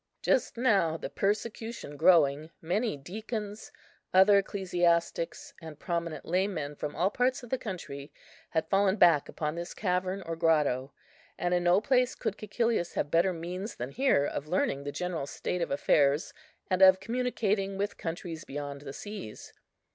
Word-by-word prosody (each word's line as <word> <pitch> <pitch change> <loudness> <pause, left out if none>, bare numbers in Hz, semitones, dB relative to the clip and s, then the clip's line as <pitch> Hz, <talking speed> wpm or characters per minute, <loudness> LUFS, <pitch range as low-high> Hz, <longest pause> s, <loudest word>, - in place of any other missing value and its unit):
Just 255 - +1
now, 200 -10 +2
the - - -6
persecution 215 -4 -2
growing, 155 -2 +4
many 200 +3 -1
deacons, 210 - -6 0.4
other 200 +2 +7
ecclesiastics, 175 -4 0
and 160 -2 -9
prominent 170 -2 -3
laymen 180 -5 -1
from 150 0 -5
all 180 +5 +1
parts 250 +2 0
of 245 - -11
the 260 - 0
country 145 -8 -7 0.4
had 160 -1 -1
fallen 195 0 +3
back 170 -7 +5
upon 150 -1 -3
this 170 +1 -6
cavern 185 0 -1
or 165 -1 -4
grotto; 150 -5 +2 0.5
and 175 0 0
in 175 0 +1
no 175 +2 +5
place 255 0 +2
could 205 - -3
Cæcilius 215 -3 -1
have 145 - -1
better 170 +3 +3
means 180 +5 -5
than 125 +3 -5
here 260 - +2
of 145 0 -4
learning 140 -5 0
the 145 - -3
general 175 -4 -3
state 180 +4 -3
of 170 - -1
affairs, 140 +1 +2 0.3
and 185 0 0
of 190 0 +8
communicating 210 -4 -1
with 200 +1 -3
countries 165 -1 -5
beyond 140 0 -6
the 140 -2 -8
seas. 205 - -8
180 Hz, 155 wpm, -29 LUFS, 155-205 Hz, 0.5 s, of